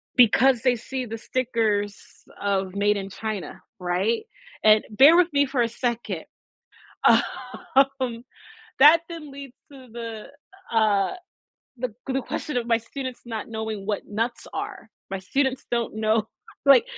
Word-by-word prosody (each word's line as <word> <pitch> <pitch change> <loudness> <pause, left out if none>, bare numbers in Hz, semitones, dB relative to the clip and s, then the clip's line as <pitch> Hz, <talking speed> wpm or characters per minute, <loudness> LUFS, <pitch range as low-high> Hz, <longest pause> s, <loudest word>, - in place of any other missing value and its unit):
Because 245 +1 +5
they 255 -1 +3
see 255 +2 -5
the 225 0 -6
stickers 220 -4 0 0.5
of 195 -2 0
Made 205 +1 +2
in 195 0 -5
China, 215 -1 -5 0.2
right, 185 - 0 0.4
and 215 0 +6
bear 275 +9 +7
with 355 -1 +4
me 285 0 +4
for 265 -2 0
a 235 - +3
second, 235 0 -3 0.8
um, 260 -3 +1 0.6
that 305 +4 +8
then 325 -3 -8
leads 275 -2 -10 0.2
to 265 -2 -13
the, 230 -2 -7 0.4
uh, 210 -4 +2 0.6
the 245 -3 -4
the 270 0 0
question 300 0 -4
of 235 -1 -1
my 230 -1 +3
students 255 +2 -7
not 225 -2 -5
knowing 220 -3 -5
what 210 -1 -2
nuts 230 +3 -3
are. - - -6 0.2
My 195 -1 -4
students 265 +6 -1
don't 235 -2 -1
know 220 0 +1 0.4
like, 275 - +7
230 Hz, 140 wpm, -24 LUFS, 215-265 Hz, 0.8 s, that